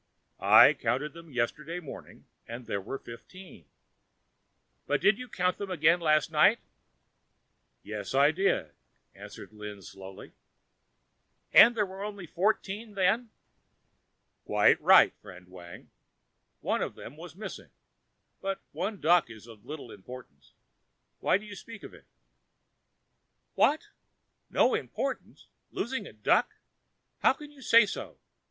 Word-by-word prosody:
"I - - +7
counted 145 +2 -2
them 170 -1 -13
yesterday 150 +7 -3
morning 155 -6 -11 0.2
and 115 +1 -8
there 100 -3 -3
were 115 +8 -6
fifteen." 120 - -13 1.2
"But - - +1
did 195 +4 +3
you 250 -1 -8
count 180 -2 -1
them 200 - -5
again 170 -1 +3
last 155 -1 +2
night?" 160 +9 +5 1.3
"Yes, 105 +3 -6
I 140 +2 +5
did," 165 - 0 0.4
answered - - -12
Lin 105 -2 -9
slowly. 95 +1 -11 1.2
"And 235 +2 +8
there 210 - +2
were 190 +1 -8
only 205 -3 -6
fourteen 205 +4 -2
then?" 200 +5 +1 1.1
"Quite - - +3
right, - - +6
friend 90 0 -13
Wang, 90 -1 -13 0.7
one - - -1
of - - -3
them 125 - -11
was 165 0 -11
missing; 215 +3 -8 0.7
but 195 0 -3
one 205 0 -4
duck 170 -4 +3
is 110 -1 -12
of 115 -3 -15
little 145 -5 -8
importance. 105 - -13 0.7
Why - - +2
do 210 - -12
you 205 -1 -9
speak 220 +2 -11
of - - -10
it?" - - -17 1.5
"What, 300 +2 +2 0.6
no - - +3
importance! - - -4 0.2
losing 265 +3 -4
a - - -12
duck? - - +1 0.6
How - - +4
can 295 -2 -12
you 285 -2 -17
say 230 -3 +6
so? 200 - -7
165 Hz, 130 wpm, -29 LUFS, -, 1.5 s, And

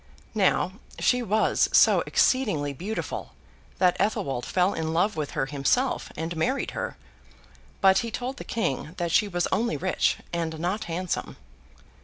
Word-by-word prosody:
Now, 195 -3 +2 0.3
she 250 0 +2
was 220 -1 +2
so - - +6
exceedingly 170 - +2
beautiful 200 +10 -5 0.4
that 180 -1 +4
Athelwold 140 - 0
fell 185 +1 +2
in 160 0 -2
love 185 +4 +2
with 150 -2 -3
her 135 - +2
himself, 145 - 0
and 165 +2 -3
married 255 +13 0
her; - - -4 0.8
but 190 0 +6
he 235 - -3
told 250 +4 -4
the - - -6
King 165 - -2
that 170 -2 -1
she 210 - +4
was 175 -3 0
only 235 +2 +1
rich—not 170 0 -1
handsome. 175 +1 -3
180 Hz, 140 wpm, -26 LUFS, 160-220 Hz, 0.8 s, so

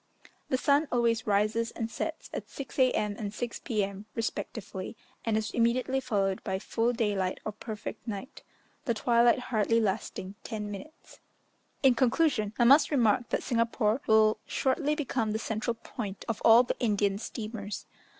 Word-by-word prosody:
The 260 - +2
sun 285 +3 +3
always 235 -2 +1
rises 215 +3 +2
and 225 -1 -4
sets 320 +7 -4
at - - -5
6 275 0 -7
A.M. 215 -5 +2
and 205 -2 -3
6 235 +3 -4
P.M. 205 -3 -2
respectively, 220 -2 -4 0.3
and 220 -2 +1
is 220 0 -2
immediately 250 +3 +1
followed 200 -7 -1
by 190 - -1
full 225 +4 0
daylight 205 -6 -1
or 215 - -2
perfect 215 +2 -7
night; 215 +3 -6 0.4
the 235 -4 +1
twilight 235 +2 +4
hardly 230 -2 +1
lasting 195 -2 -2
ten 210 -2 -5
minutes. 300 +11 -11 0.6
In 265 -2 +7
conclusion, 240 -3 +2
I - - +4
must 280 +5 +7
remark 240 -3 +2
that - - -1
Singapore 230 0 +1
will 220 0 +5
shortly 290 +3 +1
become 245 -7 -1
the - - 0
central 225 +1 -2
point 210 -3 -7
of 230 -3 -3
all 230 +2 +8
the 250 - -3
Indian 205 -3 +1
steamers. 215 -2 -6
225 Hz, 155 wpm, -29 LUFS, 210-245 Hz, 0.6 s, all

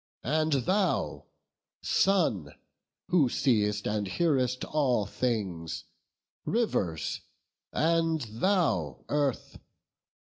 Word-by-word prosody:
and 155 +4 +1
thou 185 - 0 0.6
Sun, 140 - +1 0.5
who 165 -8 +4
see'st 105 -5 +1
And 105 -1 -1
hearest 130 - +1
all 130 -8 +1
things! 95 -8 -2 0.6
Rivers! 100 - -1 0.5
and 165 0 +1
thou 115 - 0
Earth! 145 -3 -1
130 Hz, 75 wpm, -29 LUFS, 105-165 Hz, 0.6 s, who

